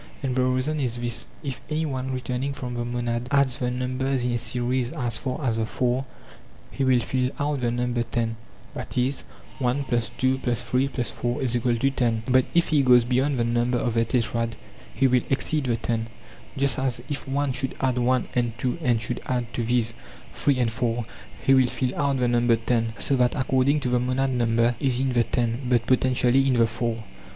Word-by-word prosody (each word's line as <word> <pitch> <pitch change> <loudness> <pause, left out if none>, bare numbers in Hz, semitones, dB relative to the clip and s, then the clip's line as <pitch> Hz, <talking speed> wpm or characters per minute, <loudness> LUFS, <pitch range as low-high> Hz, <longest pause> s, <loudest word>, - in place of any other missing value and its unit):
And 130 -2 0
the 130 - +2
reason 130 +4 0
is 120 -4 -1
this: 120 -1 -2 0.2
if 135 -3 -4
any 155 +1 0
one 130 -3 -3
treturningt 130 +1 -3
from 125 -2 -5
the 120 0 -2
monad 120 0 -2
adds 140 -3 +3
the 125 - 0
numbers 130 +1 -1
in 125 - 0
a 120 - +1
series 125 +1 -1
as 120 -7 -2
far 130 +1 -3
as 115 -3 +1
the 110 -1 -1
four, 125 +3 0 0.7
he 135 - -2
will 130 -2 +4
fill 125 +1 0
out 145 -2 -1
the 120 - +1
number 120 0 -1
ten 115 -1 -2 0.4
(i.e. 125 +1 -1 0.5
1+2+8+4=10); 125 -1 0
but 130 0 +5
if 170 - +3
he 150 -3 +4
goes 125 -3 +5
beyond 130 +3 +1
the 120 - +1
number 120 +1 +1
of 120 -1 -1
the 115 0 +3
tetrad, 115 -1 -1 0.4
he 135 - +1
will 125 -1 +4
exceed 145 +2 0
the 120 -2 +1
ten. 115 -1 -2 0.5
Just 140 0 +2
as 125 -2 -1
if 145 -1 -4
one 140 +1 0
should 130 +1 -2
add 130 -2 +1
one 125 0 +1
and 120 -2 -1
two 130 +7 -2
and 120 -6 +2
should 115 +2 -3
add 125 -2 -2
to - - -2
these 120 -1 +1 0.4
three 140 -2 +1
and 120 -3 +1
four, 120 -1 -1 0.4
he 135 - +5
will 130 -2 +5
fill 130 +1 -2
out 140 -2 +1
the 125 -1 +1
number 120 -1 +3
ten; 115 0 0
so 140 - +2
that 125 -1 +2
according 135 +2 +2
to 125 - -1
the 125 0 +2
monad 130 +2 0
number 115 -1 +2
is 130 -3 +2
in 130 -1 0
the 120 - +4
ten, 120 +1 -1
but 120 -2 +2
potentially 130 +1 +3
in 130 - +3
the 115 -1 +5
four. 115 0 -2
125 Hz, 190 wpm, -25 LUFS, 120-130 Hz, 0.7 s, but